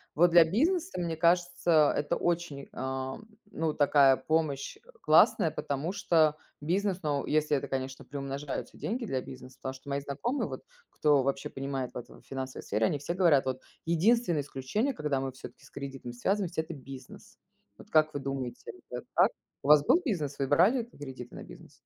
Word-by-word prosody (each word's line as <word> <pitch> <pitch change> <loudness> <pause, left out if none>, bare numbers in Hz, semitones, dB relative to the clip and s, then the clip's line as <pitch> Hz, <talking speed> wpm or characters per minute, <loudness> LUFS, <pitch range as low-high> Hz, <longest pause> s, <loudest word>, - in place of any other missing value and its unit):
Вот 175 +3 +5
для 170 0 +8
бизнеса, 320 - 0
мне 170 -2 -2
кажется, 175 -2 +3
это 145 0 0
очень, 170 -5 -2
ам, 130 - -4 0.3
ну, 160 -1 -1
такая 140 -2 +5
помощь, 150 - -1
э, - - -26 0.2
классная, - - +5
потому 145 +5 -3
что 160 -6 +3 0.3
бизнес, 185 +4 0
но 145 -3 -1
если 150 -1 +2
это, - - -4
конечно, 130 0 -4
приумножаются 140 0 -5
деньги 235 +3 -3
для 130 -11 -2
бизнеса, 130 0 -11
потому 130 0 -4
что 135 +1 -12
мои 140 0 0
знакомые 150 - -2
вот, - - -6 0.3
кто 145 -3 +3
вообще 135 0 -2
понимает 135 -2 -4
в - - -6
этой 120 - -10
финансовой 130 -1 -6
сфере, 110 +2 0
они 145 - 0
все 170 +5 -3
говорят 165 -8 +4
вот: 130 0 -2 0.2
"Единственное 175 0 +2
исключение, 145 - -2
когда 150 - -1
мы 135 0 -3
всё-таки 130 - -12
с - - -18
кредитом 135 -3 -7
связываемся- 180 +6 -1
это 160 +1 -8
бизнес". 135 -1 -12 0.4
Вот - - -14
как 155 -4 +3
вы 145 - -2
думаете, 135 -3 -5 0.2
это - - -5
так? - - +5 0.3
У - - -4
вас 150 -1 +8
был 345 - +5
бизнес? 155 - -2
Вы 135 - 0
брали 190 - +4
кредиты 130 - -10
на - - -8
бизнес? - - -13
145 Hz, 180 wpm, -29 LUFS, 135-175 Hz, 0.4 s, для